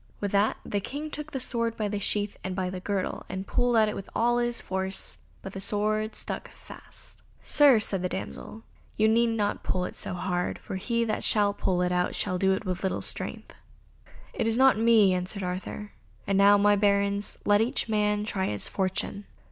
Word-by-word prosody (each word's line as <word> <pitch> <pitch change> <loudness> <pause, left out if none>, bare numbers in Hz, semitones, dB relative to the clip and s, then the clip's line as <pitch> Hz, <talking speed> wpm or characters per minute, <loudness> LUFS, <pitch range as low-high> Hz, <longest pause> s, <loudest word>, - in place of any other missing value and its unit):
With 200 -1 -2
that 205 +2 +2
the 205 - -1
King 290 +9 -6
took 300 +1 -5
the 270 - -3
sword 230 -2 -1
by 215 - -1
the 205 0 -2
sheath 205 +1 -1
and 185 0 -3
by 185 -1 -2
the 185 - -5
girdle, 195 0 -3
and 190 +1 -4
pulled 245 +3 +1
at 220 -1 +5
it 210 - -2
with 195 - -7
all 240 +1 +2
his 240 0 0
force, 190 0 -2 0.2
but 195 - -7
the 195 - -5
sword 215 +2 0
stuck - - -3
fast. - - -13 0.2
"Sir," 285 -5 +6
said 200 -3 -1
the 180 - -1
damsel, 220 +4 -7 0.3
"you 215 - +4
need 230 +2 +4
not 220 -3 -1
pull 180 - -1
half - - -4
so - - -4
hard, 180 0 -2
for - - -7
he 235 +4 0
that 220 -2 -2
shall 205 -2 +2
pull 180 -2 0
it 180 - 0
out 180 0 0
shall 185 -1 -1
do 190 0 +3
it 190 - -3
with 185 -1 -3
little 190 - -2
strength." - - -2 0.8
"It - - -1
is 225 0 +1
not 265 0 +6
for 220 - -4
me," 225 -4 +5
answered 185 +2 -2
Arthur, 185 +3 -5 0.3
"and 195 - 0
now, 200 +1 +6
my 205 0 +4
Barons, 200 0 +1
let 205 +1 +4
each 240 +3 0
man 210 -1 +1
try 195 -3 -2
his 105 -1 -1
fortune." 195 +1 -2
205 Hz, 210 wpm, -27 LUFS, 190-225 Hz, 0.8 s, Sir